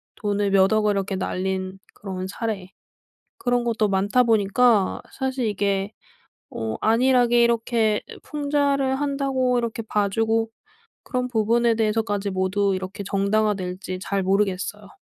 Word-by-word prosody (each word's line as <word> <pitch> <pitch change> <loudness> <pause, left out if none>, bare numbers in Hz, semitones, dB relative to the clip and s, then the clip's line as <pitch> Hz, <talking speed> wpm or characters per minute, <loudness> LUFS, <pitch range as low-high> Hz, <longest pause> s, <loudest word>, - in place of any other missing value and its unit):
돈을 205 -1 -1
몇 195 0 +4
억을 215 -1 +3
이렇게 195 0 -2
날린 190 0 -3 0.2
그런 190 -2 -5
사례 200 -2 -4 0.7
그런 245 -1 0
것도 225 -3 +1
많다 200 +6 +2
보니까 220 -1 +3 0.2
사실 265 -2 -1
이게 200 -1 -1 0.6
어 110 -1 -4
안일하게 240 +1 +4
이렇게 225 -2 +1 0.2
풍자를 285 -2 0
한다고 275 -3 0
이렇게 235 -1 -2
봐 210 -2 0
주고 225 +2 0 0.6
그런 250 -1 -2
부분에 235 0 +2
대해서까지 215 -2 0
모두 190 +1 0
이렇게 190 +2 -5
정당화될지 195 -2 -1
잘 195 0 -1
모르겠어요. 195 +1 -1
210 Hz, 290 characters per minute, -23 LUFS, 195-240 Hz, 0.7 s, 몇